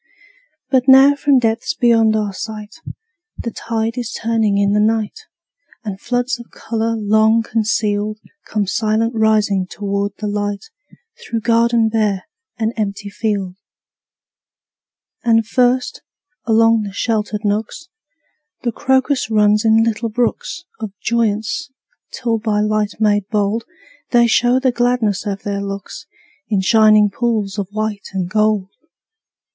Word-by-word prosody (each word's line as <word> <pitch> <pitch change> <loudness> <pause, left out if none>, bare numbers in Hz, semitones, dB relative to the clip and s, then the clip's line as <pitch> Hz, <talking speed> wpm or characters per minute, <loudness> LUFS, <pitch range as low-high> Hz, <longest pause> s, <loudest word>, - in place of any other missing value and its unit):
But 260 -1 +2
now 270 +2 +8
from 285 -1 +2
depths 230 +4 0
beyond 225 -4 +3
our 210 -2 -1
sight, 215 +3 -7 0.6
The 235 - -4
tide 225 +1 -3
is 240 -2 -4
turning 220 -3 0
in 200 0 +2
the 210 - +2
night, 225 - -1 0.6
And 200 -3 -6
floods 245 +1 -1
of 235 - -12
color 230 0 -3
long 220 +2 +3
concealed 215 -2 -1 0.3
Come 210 -2 -1
silent 220 +3 0
rising 215 -4 +2
toward 200 +1 -3
the 215 - -5
light, 205 - -3 0.5
Through 230 -1 -4
garden 230 0 +3
bare 215 -3 0 0.3
and 225 0 -1
empty 205 -1 -4
field. 200 -4 -2 1.7
And 225 -2 +3
first, 250 +1 +1 0.4
along 225 0 +4
the 200 -2 -6
sheltered 215 -1 -2
nooks, 215 +10 -2 0.8
The 240 - 0
crocus 265 +1 +1
runs 210 -1 +3
in 225 0 +4
little 230 0 -1
brooks 245 - -2 0.2
Of 215 -3 -6
joyance, 220 +1 -1 0.4
till 230 -2 -1
by 215 -1 0
light 215 0 0
made 205 -2 +2
bold 210 +2 0 0.4
They 240 -1 +4
show 245 +2 +3
the 260 -1 +2
gladness 240 -4 0
of 200 -1 -4
their 200 -1 -3
looks 200 -1 -7 0.4
In 205 -3 +1
shining 215 0 +5
pools 215 -3 -1
of 195 - -2
white 215 -1 -3
and 185 -2 -2
gold. 210 -1 +1
220 Hz, 130 wpm, -18 LUFS, 205-230 Hz, 1.7 s, now